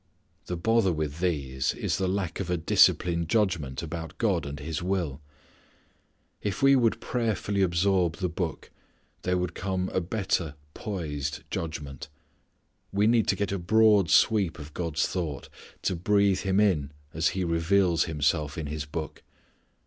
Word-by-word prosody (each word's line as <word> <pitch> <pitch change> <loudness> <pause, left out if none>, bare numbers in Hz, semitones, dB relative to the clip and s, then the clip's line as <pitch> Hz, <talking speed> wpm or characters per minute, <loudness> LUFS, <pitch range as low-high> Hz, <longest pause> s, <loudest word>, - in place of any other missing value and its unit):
The 90 - -3
bother 115 +2 +2
with 75 -1 -3
these 70 -7 -1
is - - -1
the 95 - +1
lack 95 -2 -2
of 95 -3 -3
a 90 - +1
disciplined 85 0 +3
judgment 85 - 0
about 80 0 -6
God 70 - +1
and 70 0 -6
His 80 +3 -4
will. 85 -6 -2 1.2
If 105 +7 -3
we 135 0 +7
would 120 -4 +2
prayerfully 110 -4 -1
absorb 90 -1 +2
the 95 - -1
Book, 85 -1 -4 0.5
there 90 0 0
would 90 -1 -2
come 95 0 -2
a 95 - 0
better 90 -5 -1 0.2
poised 75 - -4
judgment. 75 -5 -5 0.8
We 100 +1 +2
need 115 0 +3
to - - +3
get 100 +1 -2
a 100 - -1
broad 105 0 +4
sweep 100 -5 +3
of 75 -1 -10
God's 80 -4 -1
thought, 80 -7 -4 0.3
to 95 - 0
breathe 100 +2 +2
Him 95 0 +1
in 80 -9 +2 0.2
as 80 +1 +2
He 95 - 0
reveals 85 +1 +2
Himself 75 -1 0
in 80 - -3
this 75 +1 -4
Book. 75 0 -5
85 Hz, 155 wpm, -27 LUFS, 80-100 Hz, 1.2 s, we